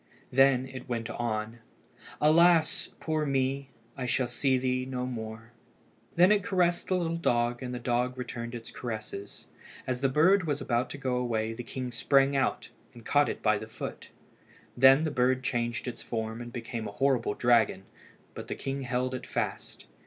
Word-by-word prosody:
Then 135 0 +4
it 130 0 -9
went 115 -1 -3
on 115 -1 -3 0.6
"Alas! 165 +1 +4
poor 155 -1 -1
me! 135 -1 0 0.3
I 130 -2 -4
shall 125 +1 +1
see 130 +2 +1
thee 130 0 0
no 130 -1 -3
more." 115 -2 -6 0.6
Then 180 +4 +6
it 210 -1 +4
caressed 180 -3 +1
the 185 - +1
little 165 -2 -1
dog, 120 -5 +1
and 125 -1 -4
the 125 - -3
dog 125 +1 -1
returned 120 -1 -5
its 115 -1 -8
caresses. 110 -4 -7 0.4
As 125 -1 -2
the 135 - +3
bird 165 +6 +4
was 145 -1 0
about 120 -1 0
to - - -6
go 130 -2 -1
away, 115 -3 -1
the 120 - -6
king 125 +1 -5
sprang 135 +4 +3
out 135 - 0 0.3
and - - -13
caught - - +3
it - - -5
by - - +3
the - - -8
foot. - - -7 0.7
Then 135 +4 +7
the 155 - -1
bird 130 0 +1
changed 120 -1 -2
its 120 -2 -5
form 110 0 -4
and 120 0 -8
became 115 -1 -5
a - - -6
horrible 130 -6 +1
dragon, 115 -6 +3 0.5
but - - -8
the - - -3
king 135 0 -4
held 125 0 -1
it 130 - -5
fast. - - -4
125 Hz, 180 wpm, -29 LUFS, 120-135 Hz, 0.7 s, Then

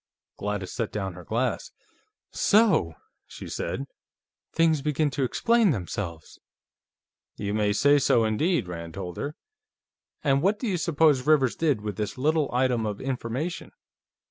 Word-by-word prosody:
Gladys 105 -2 -3
set 115 - -2
down 95 -3 -3
her 90 +1 -11
glass. 115 +8 -1 0.6
"So!" 205 - +3 0.3
she - - -9
said. 135 - -3 0.7
"Things 160 -3 +2
begin 150 0 0
to 135 +1 -1
explain 230 - +3
themselves!" 90 - -4 1.0
"You 100 0 -3
may 105 -1 +1
say 145 +7 +4
so, 120 -3 +3
indeed," 120 - +1
Rand 85 -1 -7
told 90 -3 -6
her. 145 +2 -4 0.9
"And 140 -2 +3
what 200 +5 +2
do 245 - -4
you 190 -4 0
suppose 155 -5 +2
Rivers 140 -5 +4
did 145 -9 +1
with 105 -3 -5
this 105 +4 -3
little 150 +2 +1
item 125 -3 +1
of 105 -1 -4
information? 135 +6 -4
130 Hz, 145 wpm, -26 LUFS, 105-155 Hz, 1.0 s, say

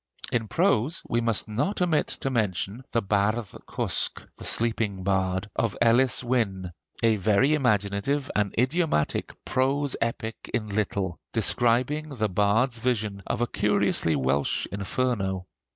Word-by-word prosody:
In 115 -2 0
prose 160 - +1
we 120 - 0
must 115 -2 0
not 125 - -1
omit 170 -5 +2
to 135 - -3
mention 105 0 -1
the 115 - +1
'Bardd 100 +2 0 0.2
Cwsg' - - 0
(The - - -12
Sleeping 110 -4 +1
Bard) 95 0 0
of 115 -3 -1
Elis 120 +2 +3
Wynne, 100 -8 -1 0.3
a 110 -1 +4
very 110 +9 +3
imaginative 115 +1 0
and 105 -2 +1
idiomatic 130 - +1
prose 135 +2 +1
epic 115 -1 -3
in 110 -3 -2
little, 100 -3 -2
describing 120 +7 +1
the 110 -3 0
bard's 110 +6 +1
vision 110 -5 -1
of - - -2
a - - +3
curiously 80 -7 +1
Welsh 70 +1 +1
Inferno. 100 -2 -1
115 Hz, 135 wpm, -26 LUFS, 100-125 Hz, 0.3 s, a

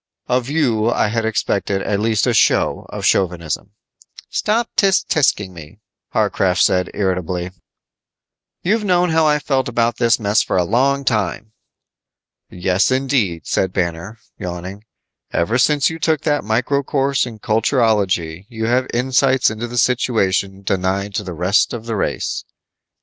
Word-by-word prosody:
Of 125 0 0
you 120 -8 +1
I 115 - +1
had 115 0 -1
expected 100 -3 -1
at 100 -1 -1
least 110 -1 +1
a - - +1
show - - +2
of - - -5
chauvinism." 85 -5 0 0.6
"Stop 225 +2 0
_tch 195 -3 +3
tch_ing 105 -10 +1
me," 85 +2 -12 0.4
Warcraft 95 -1 +1
said 90 0 +2
irritably. 90 -2 -2 1.1
"You've 215 +4 +1
known 180 -3 +2
how 160 -1 +3
I 150 0 +3
felt 135 -3 -1
about 120 -1 0
this 120 -1 +3
mess 105 0 +2
for - - -1
a 90 - +3
long 135 +8 +1
time." 110 -2 -1 1.0
"Yes, 90 +2 +1
indeed," 130 - 0
said 95 -1 0
Banner, 85 +4 -3 0.2
yawning, 90 +2 -6 0.5
"ever 110 +9 0
since 145 +2 +3
you 165 - -7
took 160 -1 +1
that 145 -2 0
micro 120 +6 0
course 135 -1 0
in 115 -2 -9
culturology 105 - 0
you 110 -2 -4
have 125 +2 +1
insights 130 0 +2
into 110 +2 -5
the 120 +1 -6
situation 100 -6 +1
denied 95 +1 -1
to 105 - -2
the 95 -2 -6
rest 90 +9 +2
of 115 -1 -6
the 115 -1 -3
race." 100 - -2
110 Hz, 150 wpm, -19 LUFS, 95-130 Hz, 1.1 s, tch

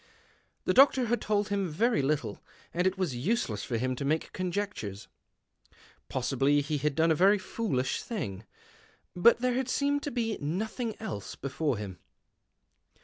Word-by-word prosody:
The - - +2
doctor 265 -1 +6
had 235 +1 0
told 210 0 0
him 200 -3 0
very 220 +6 +2
little, 145 +2 -1 0.3
and 180 +2 +2
it 190 +1 0
was 180 -9 -1
useless 120 - -1
for 120 - -2
him 130 +2 -1
to - - -3
make 155 +3 -1
conjectures. 180 - -3 1.0
Possibly 135 +3 +2
he 145 +1 -2
had 150 0 0
done 165 0 +3
a - - +6
very 195 +6 +5
foolish 185 - -2
thing, 105 - -4 0.7
but 235 +7 +5
there 250 0 +2
had 260 0 -1
seemed 285 +2 +1
to 290 - -3
be 230 -4 -2
nothing 220 - -3
else 100 -1 -5
before 140 -1 -2
him. 95 -3 -7
175 Hz, 155 wpm, -29 LUFS, 135-220 Hz, 1.0 s, doctor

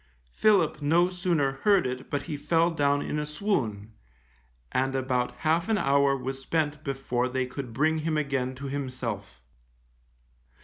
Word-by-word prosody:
Philip 180 - +3
no 170 +5 +3
sooner 170 -6 +1
heard 200 -3 +4
it 130 0 -4
but 145 - -2
he 150 - -4
fell 165 +4 +2
down 145 -2 +1
in 150 - -2
a - - -1
swoon, 120 - -2 0.8
and 135 +1 0
about 125 -2 0
half 165 +5 +2
an 220 - +3
hour 140 -4 +3
was 135 +1 -5
spent 150 0 -1
before 130 -3 -1
they 130 0 -1
could 125 -1 -6
bring 155 +6 +1
him 155 0 -1
again 135 -3 -1
to 140 +2 -8
himself. 130 - -5
140 Hz, 150 wpm, -27 LUFS, 130-160 Hz, 0.8 s, heard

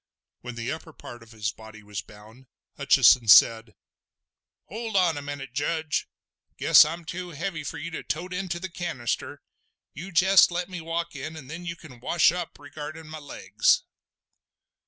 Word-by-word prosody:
When 125 -1 -8
the 120 +2 -4
upper 160 +1 -8
part 120 -4 -11
of 115 0 -16
his 110 -1 -3
body 110 -2 -14
was 105 -1 -6
bound, 110 +5 -17 0.3
Hutcheson 120 -3 +5
said: 110 0 +6 0.9
"Hold 225 +1 -6
on 180 -4 +3
a 145 - -5
moment, 145 -2 -7
Judge. 155 +3 -1 0.5
Guess - - +7
I'm 165 +2 -6
too 180 +2 -6
heavy 165 0 -5
for 140 - -6
you 170 +3 -6
to 160 - -5
tote 180 +4 -4
into 180 -2 -3
the 190 - -5
canister. 170 -9 -4 0.5
You 175 +7 -8
jest 190 +3 +6
let 180 +1 -3
me 180 -2 -6
walk 165 +1 -4
in, 160 +1 -6
and 145 -3 -10
then 175 +2 -7
you 170 - -4
can 145 -7 -14
wash 160 +6 +3
up 175 -1 -5
regardin' 155 +2 -9
my 155 0 -7
legs!" 105 -8 +1
155 Hz, 170 wpm, -26 LUFS, 125-175 Hz, 0.9 s, Guess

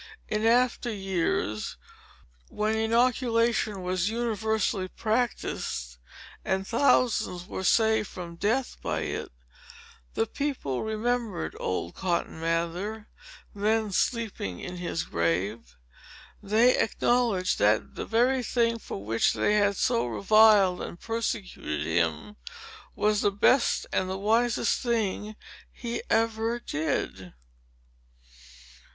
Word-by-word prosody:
In 215 +1 0
after 240 0 +2
years, 180 - -2 0.7
when 215 +1 -1
inoculation 230 -2 +1
was 185 +1 0
universally 220 -4 -1
practised, 215 - -2 0.4
and 190 0 -1
thousands 230 -6 +2
were 190 - -5
saved 220 +1 +3
from 170 -2 -8
death 230 +9 -1
by - - -2
it, - - -4 0.9
the - - +2
people 250 - -3
remembered 220 -2 -2
old 90 -2 -2
Cotton 175 -3 -2
Mather, 170 +6 -2 0.4
then 215 +1 0
sleeping 200 - -1
in 180 0 -6
his 170 -2 -2
grave. 90 - -2 0.6
They 220 +5 +3
acknowledged 225 -5 +1
that 105 +1 +2
the - - -6
very 250 +3 +2
thing, 230 -1 +1
for 100 - -7
which 115 +2 +2
they 210 - +1
had 205 -2 +2
so 120 +1 +1
reviled 195 - +5
and 175 - -7
persecuted 225 -4 -3
him, 210 0 -1 0.6
was 210 0 +2
the 205 - +3
best 205 +6 +3
and 185 - 0
wisest 230 +4 +1
thing 215 -3 -1 0.4
he 235 -1 -5
ever 225 +1 +1
did. 145 - -3
210 Hz, 105 wpm, -27 LUFS, 180-230 Hz, 0.9 s, reviled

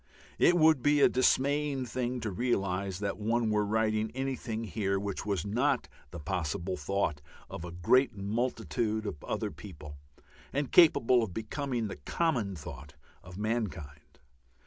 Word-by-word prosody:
It 175 - +5
would 155 -4 +5
be 145 +2 +3
a - - +7
dismaying 140 +1 +2
thing 125 0 -3
to 110 -1 -3
realize 95 -3 -1
that 100 0 -2
one 115 +1 +1
were 105 0 +2
writing 110 +1 +1
anything 130 -4 -3
here 100 -1 -1
which 100 0 -4
was 100 -4 -1
not 105 +5 +1 0.2
the 85 - -8
possible 90 +2 -2
thought 75 -2 -1 0.3
of 85 +1 -7
great 130 +1 +4
multitudes 110 0 -1
of 75 -8 -5
other - - -2
people, 75 -1 -10 0.5
and 140 -1 -2
capable 130 -8 +6
of 100 -6 -4
becoming 120 +1 -2
the 100 - -7
common 125 - -1
thought 70 -2 -9 0.3
of 90 0 -11
mankind. 95 -10 -4
110 Hz, 145 wpm, -30 LUFS, 95-125 Hz, 0.5 s, a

